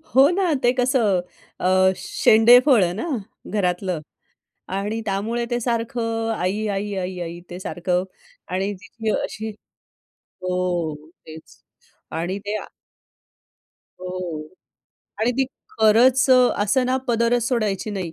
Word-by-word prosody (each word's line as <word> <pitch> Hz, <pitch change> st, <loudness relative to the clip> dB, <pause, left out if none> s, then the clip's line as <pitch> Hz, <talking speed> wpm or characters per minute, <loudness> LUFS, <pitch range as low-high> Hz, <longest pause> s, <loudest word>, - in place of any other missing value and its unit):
हो 275 Hz, +3 st, +7 dB
ना. 355 Hz, -3 st, +1 dB
ते 245 Hz, -, +5 dB
कसं? 245 Hz, -7 st, +2 dB, 0.4 s
अ, 185 Hz, +1 st, +4 dB
शेंडेफळ 240 Hz, +1 st, +5 dB
आहे 175 Hz, 0 st, 0 dB
ना 275 Hz, -, -4 dB, 0.4 s
घरातलं 180 Hz, -3 st, 0 dB, 0.8 s
आणि 210 Hz, +3 st, -2 dB
त्यामुळे 220 Hz, +5 st, -1 dB
ते 240 Hz, 0 st, 0 dB
सारखं 230 Hz, -1 st, -1 dB
आई, 200 Hz, +4 st, -1 dB
आई, 200 Hz, 0 st, -2 dB
आई, 185 Hz, 0 st, -3 dB
आई 170 Hz, 0 st, -6 dB
ते 175 Hz, -, -6 dB
सारखं 180 Hz, 0 st, -1 dB, 0.5 s
आणि 195 Hz, +2 st, -1 dB
तिची 215 Hz, +3 st, -5 dB
अशी 220 Hz, +1 st, -5 dB, 0.7 s
हो. 180 Hz, -4 st, -2 dB, 0.3 s
तेच. 160 Hz, 0 st, -13 dB, 0.5 s
आणि 175 Hz, +4 st, -2 dB
ते 210 Hz, +1 st, -1 dB, 1.4 s
हो 180 Hz, -4 st, -5 dB, 0.8 s
आणि 235 Hz, +3 st, +3 dB
ती 265 Hz, -, +4 dB, 0.3 s
खरंच 245 Hz, +5 st, +5 dB
असं 250 Hz, -1 st, +4 dB
ना 260 Hz, +1 st, +2 dB
पदरच 235 Hz, 0 st, +2 dB
सोडायची 215 Hz, -4 st, -1 dB
नाही 185 Hz, -5 st, -4 dB
210 Hz, 115 wpm, -22 LUFS, 185-235 Hz, 1.4 s, हो